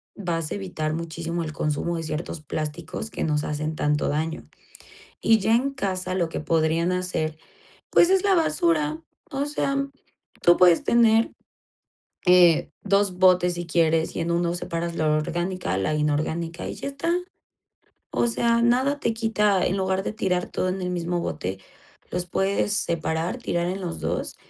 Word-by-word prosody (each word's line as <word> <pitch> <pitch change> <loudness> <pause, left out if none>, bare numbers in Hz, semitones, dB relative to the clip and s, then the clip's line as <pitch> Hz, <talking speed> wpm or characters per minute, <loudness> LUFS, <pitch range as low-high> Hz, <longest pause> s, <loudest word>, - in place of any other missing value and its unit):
vas 165 -5 -3
a - - -1
evitar 175 -6 -3
muchísimo 165 +1 -4
el 155 -1 -5
consumo 155 +3 -1
de 165 - -4
ciertos 155 +1 -4
plásticos 155 +7 -5
que - - -3
nos 150 -2 0
hacen 155 +1 -3
tanto 150 -1 0
daño. 160 +2 -2 0.7
Y 225 0 +4
ya 220 +2 +2
en 260 +4 +2
casa 185 -6 -2
lo 175 -3 +1
que - - -4
podrían 165 +2 +1
hacer, 180 -4 -2 0.5
pues 345 - +6
es 385 -1 +4
la 395 -1 +4
basura, 155 - +1 0.3
o 275 +1 -1
sea, 275 -1 0 0.6
tú 175 0 +6
puedes 175 -2 +5
tener 230 -1 +4 0.9
eh, 180 -3 +5
2 195 -2 +1
botes 180 -1 +5
si 175 0 -5
quieres 165 -1 +1
y - - -2
en 165 +1 -1
1 170 0 0
separas 170 -1 -3
la 155 - 0
orgánica, 175 - -1
la 95 +11 0
inorgánica 155 +3 -1
y - - -4
ya - - -6
está. 280 +5 -1 1.0
O 240 - +1
sea, 235 0 +2
nada 260 +4 +2
te 230 - +1
quita, 210 -4 +2
en 190 - 0
lugar 190 0 0
de - - -2
tirar 180 -4 0
todo 185 - -2
en 190 +1 -3
el 180 - -2
mismo 175 0 -1
bote, 90 - -4 0.5
los 180 0 -2
puedes 195 +3 +1
separar, 170 -2 0
tirar 175 0 -1
en 185 +2 -3
los 175 -3 -4
2 - - -2
175 Hz, 165 wpm, -24 LUFS, 160-195 Hz, 1.0 s, pues